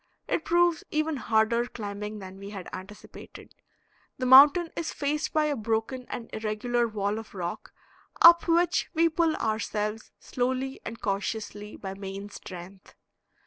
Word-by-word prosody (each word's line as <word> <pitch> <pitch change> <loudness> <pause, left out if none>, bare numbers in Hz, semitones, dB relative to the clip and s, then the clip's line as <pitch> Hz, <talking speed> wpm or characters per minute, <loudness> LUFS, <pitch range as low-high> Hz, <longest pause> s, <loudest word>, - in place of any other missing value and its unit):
It 330 - -1
proves 345 -1 +2
even 310 0 -1
harder 230 +1 +1
climbing 210 -2 -6
than 190 -1 -10
we 200 0 -8
had 195 -4 -8
anticipated; 190 +3 -11 0.6
the 255 - -2
mountain 285 +7 +8
is 335 - -3
faced 295 +2 -2
by 310 -1 +2
a 295 -1 0
broken 225 +2 -2
and 230 - -6
irregular 225 +3 -1
wall 210 -1 -2
of 225 -2 -12
rock, 175 -2 -5 0.5
up 340 +1 +8
which 340 +1 +2
we 330 +1 +4
pull 325 0 +1
ourselves 215 0 -2
slowly 260 +2 -2
and 230 0 -7
cautiously 205 +1 -4
by 190 -1 -6
main 195 +1 -7
strength. 185 -1 -11
225 Hz, 145 wpm, -27 LUFS, 205-290 Hz, 0.6 s, mountain